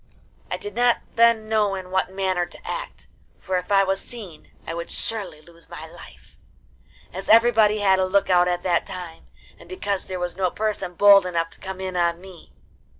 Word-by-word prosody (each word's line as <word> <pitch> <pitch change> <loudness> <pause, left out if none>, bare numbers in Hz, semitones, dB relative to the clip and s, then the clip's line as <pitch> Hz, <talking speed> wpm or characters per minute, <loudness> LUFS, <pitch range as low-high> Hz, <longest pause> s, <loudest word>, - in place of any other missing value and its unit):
I - - -2
did 415 -2 -8
not 245 -1 +3 0.2
then 230 -1 +4
know 210 -2 +1
in 185 -1 -8
what 190 0 0
manner 190 -2 -1
to - - -13
act, - - -6 0.3
for 185 -1 -2
if 180 +3 -10
I 195 -1 +5
was 195 0 -1
seen 200 -10 -10 0.2
I - - -5
would 170 0 -6
surely 205 -9 -4
lose 170 +1 -18
my - - -8
life, - - -15 0.8
as 190 +2 -7
everybody 220 -1 +5
had 195 -2 +3
a 190 - +2
look 195 +1 +2
out 180 -1 +4
at 175 0 -1
that 175 -2 +1
time, 180 -4 -9 0.3
and - - -16
because 205 - -3
there 185 -1 -4
was 180 0 -4
no 185 -1 0
person 210 -3 -3
bold 200 0 +6
enough 165 -2 -2
to - - -12
come 190 0 -7
in 190 -1 -5
on 170 -1 +1
me. 185 -3 -14
190 Hz, 200 wpm, -23 LUFS, 180-210 Hz, 0.8 s, bold